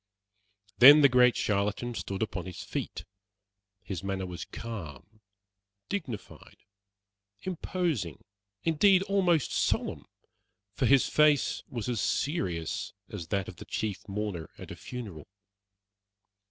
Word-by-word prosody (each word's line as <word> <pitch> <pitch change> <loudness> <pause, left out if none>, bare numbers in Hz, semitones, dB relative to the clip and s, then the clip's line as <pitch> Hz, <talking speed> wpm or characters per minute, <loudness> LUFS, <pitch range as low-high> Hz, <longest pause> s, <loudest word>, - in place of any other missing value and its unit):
Then 145 +4 +10
the 140 - +7
great 125 -1 +5
charlatan 105 +4 0
stood 100 -2 -3
upon 95 -4 -4
his 90 - -7
feet. - - -5 0.8
His 95 -2 -5
manner 95 -1 -2
was 90 -1 -6
calm, 105 - -8 0.7
dignified, 155 - -6 0.9
imposing, 165 - -2 0.4
indeed 185 +4 +4
almost 185 -6 +2
solemn, - - -1 0.7
for 125 - +1
his 135 0 +5
face 150 -3 +3
was 120 -3 -4
as 120 -4 -1
serious 100 - -1 0.2
as 100 -8 -6
that 95 +2 -1
of - - -9
the - - -9
chief 105 -1 -3
mourner 100 -5 -4
at - - -9
a - - -6
funeral. 105 -12 -8
110 Hz, 115 wpm, -29 LUFS, 95-145 Hz, 0.9 s, Then